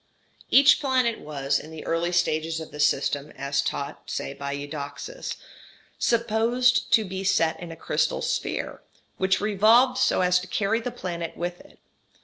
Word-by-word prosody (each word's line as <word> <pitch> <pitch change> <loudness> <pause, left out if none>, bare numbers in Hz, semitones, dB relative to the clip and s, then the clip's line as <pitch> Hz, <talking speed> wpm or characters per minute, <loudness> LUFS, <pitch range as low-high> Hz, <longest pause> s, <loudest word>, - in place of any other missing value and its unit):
Each 275 +1 +7
planet 255 -5 +1
was, 140 -2 -1
in 155 - -11
the 160 -1 -9
early 165 +1 0
stages 165 -2 0
of 160 - -8
this 150 0 +3
system, 145 0 -1
as 140 0 0
taught, 140 +1 -5
say, 140 - -3
by 140 0 -5
Eudoxus, 145 - -6 0.6
supposed 235 +2 +2
to 220 - +5
be 190 0 -5
set 165 -4 +2
in 175 -2 -8
a - - -7
crystal - - -1
sphere, - - -3 0.4
which 190 0 +2
revolved 220 +5 +4
so - - +3
as 180 0 +3
to 180 - -8
carry 200 +4 0
the 235 - -4
planet 175 -8 -5
with 175 +1 -4
it. - - -18
180 Hz, 160 wpm, -25 LUFS, 155-230 Hz, 0.6 s, Each